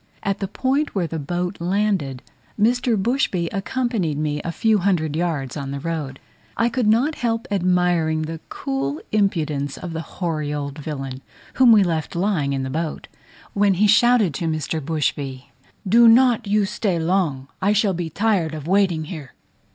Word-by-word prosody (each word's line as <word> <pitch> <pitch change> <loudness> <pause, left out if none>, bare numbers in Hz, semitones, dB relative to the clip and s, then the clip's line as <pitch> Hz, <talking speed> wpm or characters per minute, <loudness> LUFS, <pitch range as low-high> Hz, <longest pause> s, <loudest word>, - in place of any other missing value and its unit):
At 195 0 -1
the 195 - -2
point 265 +8 -1
where 185 -3 +1
the 160 0 -4
boat 175 +5 -3
landed, 180 -8 0 0.4
Mr. 240 +1 +2
Bushby 190 - 0
accompanied 200 - -1
me 150 -1 -1
a 170 - -3
few 220 +4 +2
hundred 170 -6 0
yards 155 -6 -2
on 140 -2 -5
the 140 0 -4
road: 150 -4 -4 0.4
I 230 - +2
could 240 -1 0
not 240 +9 +3
help 230 -4 -2
admiring 180 -4 +1
the 160 +1 -5
cool 135 +2 -3
impudence 155 -9 0
of 175 -2 -6
the 160 - -3
hoary 160 -4 -3
old 145 0 -4
villain, 135 -3 -5 0.3
whom 255 -2 +6
we 210 -3 +7
left 165 -3 -2
lying 170 -6 0
in 135 -1 -1
the 130 - -4
boat, 160 +1 -4 0.4
when 200 -1 +3
he 205 +4 +3
shouted 220 -4 +4
to 165 +4 -3
Mr. 155 0 -2
Bushby, 140 -3 -3 0.4
"Do 235 +4 +6
not 240 -1 +5
you 205 0 +2
stay 200 -3 -1
long, 160 -6 0
I 195 +2 +3
shall 210 -1 +2
be 170 -2 -3
tired 185 -4 0
of 155 0 -7
waiting 185 -4 +2
here." 155 -5 -8
175 Hz, 170 wpm, -22 LUFS, 150-210 Hz, 0.4 s, we